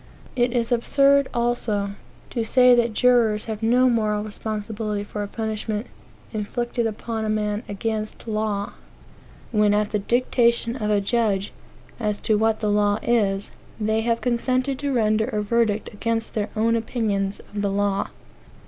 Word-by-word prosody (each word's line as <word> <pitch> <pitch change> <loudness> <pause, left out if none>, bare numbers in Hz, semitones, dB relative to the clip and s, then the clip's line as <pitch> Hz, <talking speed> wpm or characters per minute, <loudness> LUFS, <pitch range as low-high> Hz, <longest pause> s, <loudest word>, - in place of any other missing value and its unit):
It 245 -1 +2
is 235 -1 -1
absurd, 275 +3 +3
also, 230 -4 0 0.4
to 235 - -1
say 250 +2 +5
that 235 -2 +2
jurors 235 -4 +3
have 220 -1 -5
no 245 +3 +4
moral 215 -3 +1
responsibility 215 0 -4
for 205 0 -5
a 205 - -3
punishment 220 0 -3 0.5
indicted 235 +2 -2
upon 225 +1 -4
a 215 - -1
man 210 0 0
against 215 +2 -4
law, 215 -2 -2 0.8
when, 210 -2 +3
at 210 0 0
the 210 - +1
dictation 235 +1 +1
of 215 -5 -2
a 205 -1 +3
judge 205 -2 0 0.5
as 210 -2 -1
to 215 - +2
what 220 +1 +1
the 210 -1 +1
law 205 0 +2
is, 200 -4 +1 0.3
they 220 +1 +1
have 230 0 0
consented 255 +2 0
to 285 -1 -1
render 220 -3 +2
a 215 -4 -2
verdict 220 -1 0
against 225 +2 -2
their 210 -1 -1
own 225 +1 +2
opinions 210 -4 -1
of 205 - -2
the 200 - +1
law. 200 0 0
220 Hz, 155 wpm, -23 LUFS, 210-235 Hz, 0.8 s, say